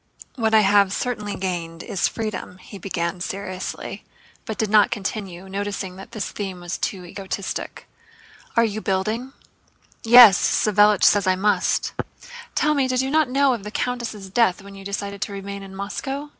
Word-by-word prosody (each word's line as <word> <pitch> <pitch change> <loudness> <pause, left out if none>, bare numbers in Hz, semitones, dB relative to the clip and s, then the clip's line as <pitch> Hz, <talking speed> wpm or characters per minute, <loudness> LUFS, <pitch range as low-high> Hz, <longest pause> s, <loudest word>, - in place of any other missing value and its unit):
"What 220 -3 +1
I 215 - +7
have 200 -1 +4
certainly 210 -2 -3
gained 170 -3 -4
is 190 - 0
freedom," 215 -4 -5
he 195 +2 -12
began 175 -1 -3
seriously, 185 0 -5 0.4
but 220 - -5
did 215 -2 -1
not 210 -2 +6
continue, 195 -3 -5
noticing 195 -1 -4
that 190 - -11
this 215 -5 -4
theme 195 -3 -5
was 175 +1 -5
too 185 -3 -3
egotistic. 190 +1 -5
"And 455 - -25
are 230 - +6
you 215 0 -3
building?" 215 +8 -2 0.7
"Yes. 230 -4 +9
Savélich 210 -1 +3
says 200 -2 +5
I 185 - +4
must!" 205 +3 +1 0.6
"Tell 300 - +3
me, 285 - +1
you - - -7
did 255 0 +1
not 310 -3 +3
know 275 0 +3
of 225 -5 -5
the 210 - -6
countess' 230 -4 -3
death 195 -2 +2
when 200 0 -11
you 195 0 -11
decided 200 0 -5
to 200 - -3
remain 200 0 -6
in 195 -1 -10
Moscow?" 270 +9 -4
200 Hz, 170 wpm, -23 LUFS, 190-225 Hz, 0.7 s, Yes